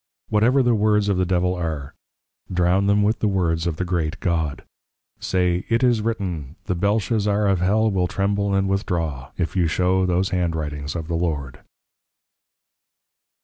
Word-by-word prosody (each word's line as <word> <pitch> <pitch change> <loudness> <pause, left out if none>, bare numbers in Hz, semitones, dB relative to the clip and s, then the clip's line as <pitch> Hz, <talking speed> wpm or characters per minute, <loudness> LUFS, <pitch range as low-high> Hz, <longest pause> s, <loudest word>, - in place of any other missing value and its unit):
Whatever 120 +6 +3
the 120 -1 +3
Words 105 -1 +2
of 100 - +1
the 90 -1 +1
Devil 90 0 +1
are, 80 -6 -4 0.6
drown 90 +2 +2
them 100 +1 +3
with 110 +2 +1
the 110 - +1
words 85 -4 0
of 85 - -1
the 90 - -3
Great 85 -1 -2
God. 80 -5 -1 0.6
Say, 90 -1 0
It 115 +2 +2
is 120 -3 +3
Written 90 - -3
The - - -1
Belshazzar 105 +2 +1
of 95 -2 +2
Hell 110 +4 +2
will 90 -2 +1
Tremble 100 +2 0
and 95 0 +1
Withdraw, 85 -9 -2
if 85 - -2
you 90 -3 +2
show 90 +3 +1
these 90 +1 +1
Hand 90 -3 0
Writings 75 -2 -4
of 80 -2 -4
the 85 - -3
Lord. 75 -7 -2
90 Hz, 165 wpm, -22 LUFS, 85-100 Hz, 0.6 s, Whatever